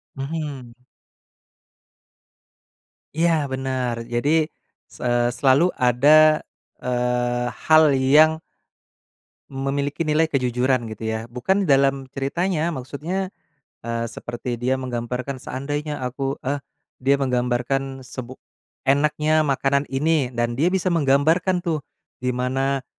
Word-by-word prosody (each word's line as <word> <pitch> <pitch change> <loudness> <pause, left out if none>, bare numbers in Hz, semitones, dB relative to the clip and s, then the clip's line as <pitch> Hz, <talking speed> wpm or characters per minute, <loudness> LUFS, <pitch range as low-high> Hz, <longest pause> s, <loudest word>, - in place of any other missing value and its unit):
Mhm. 135 -4 -5 2.4
Iya, 170 +1 +3 0.2
benar. 130 -2 -2 0.2
Jadi, 120 +5 +1 0.6
s - - -13
eee, 120 -1 +2
selalu 135 +5 +4
ada, 150 +5 +5 0.4
eee, 125 0 0 0.2
hal 155 0 +7
yang 150 +4 +6 1.2
memiliki 140 +3 -2
nilai 155 +1 +2
kejujuran, 125 -2 +1
gitu 110 +1 -5
ya. 110 0 -1
Bukan 125 - 0
dalam 135 -2 +3
ceritanya, 165 +4 -1
maksudnya, 170 +7 -4 0.5
eee, 115 0 -3
seperti 120 +1 -5
dia 130 +2 +1
menggambarkan, 125 +1 -4
seandainya 145 +1 -4
aku 135 +2 -3
eh 140 +2 -1 0.4
dia 135 +2 +3
menggambarkan 130 +1 -1
sebu 125 0 -8 0.5
enaknya 150 +3 +2
makanan 140 -1 +1
ini, 150 0 +1
dan 120 0 0
dia 145 +8 +2
bisa 185 -1 0
menggambarkan 165 +5 +2
tuh. 160 -4 -1 0.4
Gimana 130 +2 -1
135 Hz, 100 wpm, -22 LUFS, 125-150 Hz, 2.4 s, hal